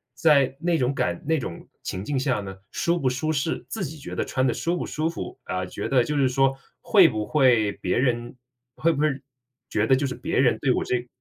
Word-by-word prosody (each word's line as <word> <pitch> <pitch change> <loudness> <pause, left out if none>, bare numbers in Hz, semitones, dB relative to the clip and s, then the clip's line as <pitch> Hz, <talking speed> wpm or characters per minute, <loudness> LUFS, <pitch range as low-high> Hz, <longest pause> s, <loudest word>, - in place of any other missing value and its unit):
在 140 -3 +4
那 170 0 +1
种 125 +1 +2
感 85 -9 -1
那 160 0 +3
种 85 - -7 0.2
情 95 - -4
境 140 +1 -1
下 130 -5 0
呢， 95 -1 -7 0.2
舒 170 0 0
不 135 - 0
舒 145 +5 -1
适， 155 +2 -1
自 210 -4 -3
己 155 +2 -7
觉 - - -7
得 - - 0
穿 130 0 0
得 - - +2
舒 170 +1 -1
不 - - -3
舒 155 +1 -2
服？ 170 - -7
啊， 90 0 -2
觉 90 - -5
得 130 -3 +4
就 150 +3 -2
是 135 -2 +4
说 135 +1 +2 0.3
会 195 -6 +6
不 110 -3 -2
会 120 -5 +3
别 90 - -2
人 120 -2 0 0.4
会 165 - +2
不 145 - -3
会 155 - +4 0.6
觉 105 - +1
得 130 - +5
就 140 +2 0
是 125 - -4
别 125 - -1
人 120 -4 +4
对 135 - +2
我 - - 0
这 125 0 -2
130 Hz, 250 characters per minute, -25 LUFS, 120-155 Hz, 0.6 s, 会